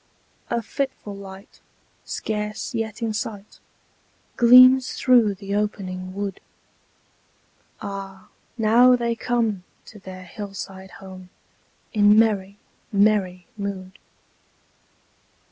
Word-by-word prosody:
A 235 -1 -1
fitful 265 -4 -4
light, 195 +3 -12 0.5
scarce 210 +2 -4
yet 225 0 -4
in 225 -1 -1
sight, 210 -1 -6 0.8
Gleams 255 +2 +7
through 235 -5 +3
the 200 +1 -6
opening 185 -3 -3
wood: 200 -1 -4 1.4
Ah! 195 -1 -7 0.3
now 240 +3 +5
they 235 -1 -1
come 225 -6 -1 0.2
to 210 - -13
their 185 -1 -10
hill 200 +2 -8
side 190 0 -8 0.2
home, 185 -1 -11 0.6
In 210 -1 +5
merry, 200 -3 +2 0.3
merry 200 -3 +2
mood. 195 -2 -6
205 Hz, 95 wpm, -23 LUFS, 195-225 Hz, 1.4 s, Gleams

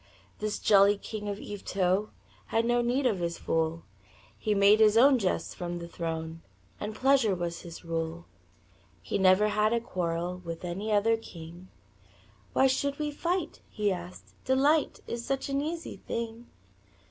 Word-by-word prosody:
This 210 0 -2
jolly 200 0 +5
king 210 0 -6
of 200 - -3
Yvetot 195 0 -1 0.4
Had 225 - +1
no 240 0 +2
need 250 +3 0
of 215 -7 +2
his 170 -1 -2
fool 165 0 -1 0.5
He 210 -1 -1
made 200 +2 +6
his 215 0 +5
own 265 +2 +6
jests 190 -4 -1
from 175 -1 -4
the 170 0 -7
throne 165 -1 -5 0.4
And 215 +1 -4
pleasure 260 -5 +3
was 170 -1 -4
his 170 0 -10
rule. 165 0 -3 0.8
He - - -2
never 190 +2 +5
had 215 +1 +2
a 235 - +2
quarrel 180 -4 -3
With 165 +1 -6
any 195 +5 -3
other 220 +2 +3
king; 175 -3 -11 0.9
"Why 265 - +4
should 280 +2 +1
we 300 -1 -2
fight?" 340 +2 -2
he 210 -2 0
asked. 180 -1 -7
"Delight 280 +4 +2
Is 235 0 -4
such 270 +2 -2
an 275 0 0
easy 325 +3 -4
thing." 230 +1 -5
205 Hz, 160 wpm, -29 LUFS, 175-240 Hz, 0.9 s, made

